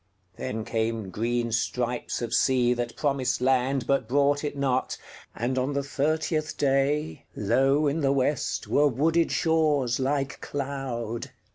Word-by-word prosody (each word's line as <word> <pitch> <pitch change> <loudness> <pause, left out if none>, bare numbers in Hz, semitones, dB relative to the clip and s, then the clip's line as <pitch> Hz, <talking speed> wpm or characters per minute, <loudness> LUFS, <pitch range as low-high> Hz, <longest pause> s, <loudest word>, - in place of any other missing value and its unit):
Then 110 +3 -4
came 115 -3 -2
green 120 +3 -1
stripes 120 +2 -1
of 120 - -3
sea 125 -2 +3
that 120 -1 -4
promised 135 -4 0
landBut 130 0 +1
brought 145 +3 +2
it 145 -1 -3
not, 130 -2 0 0.4
and 130 +3 -1
on 130 +3 -1
the 140 0 -1
thirtieth 155 +2 -1
dayLow 135 - +1
in 150 +3 0
the 135 -1 +2
West 140 +2 0
were 145 +1 +4
wooded 160 +6 +2
shores 150 -7 +2
like 135 0 -1
cloud. 130 -5 -4
135 Hz, 130 wpm, -26 LUFS, 120-145 Hz, 0.4 s, were